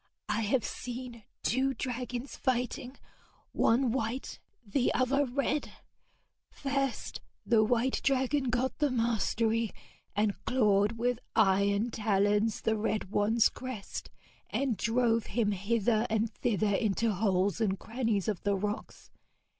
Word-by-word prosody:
'I - - +1
have 225 +2 +1
seen 245 -3 -6 0.2
two 265 +3 +1
dragons 250 +1 -4
fighting 250 +1 -2 0.5
one 245 +1 +3
white, 245 +1 -3 0.3
the 245 +5 +1
other 275 +2 +2
red. 280 +3 -1 0.8
First 275 -2 -2 0.2
the 225 -2 +4
white 245 +3 +1
dragon 270 +1 +2
got 255 +3 -1
the 295 -2 +3
mastery, 230 -1 +1 0.5
and 210 -1 0
clawed 210 -4 +3
with 240 +1 -1 0.2
iron 200 +2 +3
talons 210 0 +1
the 220 - +1
red 210 -2 -2
one's 215 +2 +4
crest, 255 -6 -6 0.4
and 270 -4 0
drove 230 0 +1
him 220 -4 +1
hither 215 +3 +1
and 220 0 0
thither 215 -3 0
into 220 +2 +1
holes 195 +1 +1
and 195 -3 +1
crannies 225 -2 -1
of 205 -5 -1
the 200 0 +1
rocks. 205 +2 -5
230 Hz, 120 wpm, -30 LUFS, 210-250 Hz, 0.8 s, the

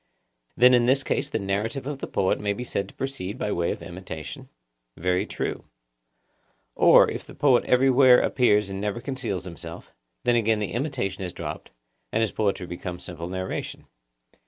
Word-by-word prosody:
Then 125 +1 +7
in 120 -1 +4
this 135 +2 +3
case - - -1
the - - -1
narrative 105 +6 -2
of 140 -1 -4
the - - -5
poet 95 - +1
may 105 -1 0
be 120 - -5
said 100 -5 -3
to - - -16
proceed 130 -6 -4
by 105 - -2
way 85 -2 0
of - - -4
imitation? 85 -4 -8 0.5
Very 90 +3 0
true. - - -4 1.1
Or, - - +7
if - - -5
the - - -13
poet 130 -4 +4
everywhere 130 0 +6
appears 105 -6 +2
and 95 0 -4
never 105 +2 -2
conceals 120 - -3
himself, 85 -2 -9 0.3
then 120 -1 +3
again 110 -1 +2
the 105 -2 -3
imitation 120 - -2
is 90 -1 -5
dropped, - - -6 0.4
and 110 - +1
his 110 - +1
poetry 100 -3 -1
becomes 90 0 -6
simple 85 -1 -6
narration. 95 +1 -5
105 Hz, 175 wpm, -25 LUFS, 95-125 Hz, 1.1 s, Then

